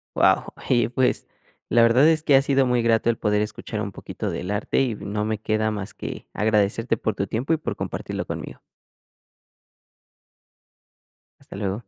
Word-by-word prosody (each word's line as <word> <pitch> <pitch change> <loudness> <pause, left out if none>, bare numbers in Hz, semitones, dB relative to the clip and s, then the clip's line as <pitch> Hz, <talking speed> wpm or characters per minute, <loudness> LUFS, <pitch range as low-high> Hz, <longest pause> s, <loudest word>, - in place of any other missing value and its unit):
Wao, - - +3 0.2
y 120 -3 +3
pues 125 +1 +1 0.4
la 115 +1 +5
verdad 120 +6 +5
es 160 -1 +3
que 145 - +5
ha 135 - +7
sido 135 -1 +2
muy 125 -1 +2
grato 115 0 +2
el 115 - +1
poder 105 -1 +1
escuchar 105 0 -4
un - - -4
poquito - - -5
del 90 - -4
arte 105 +5 0
y 125 -5 0
no 105 +1 -3
me 110 0 -1
queda 110 +1 0
más 105 -1 -5
que - - -7
agradecerte 110 +2 +1
por 110 - -1
tu 100 - -2
tiempo 125 - -1
y - - +2
por 155 - -4
compartirlo - - -4
conmigo. - - -6 2.8
Hasta - - -12
luego. 100 0 -2
110 Hz, 170 wpm, -24 LUFS, 105-125 Hz, 2.8 s, ha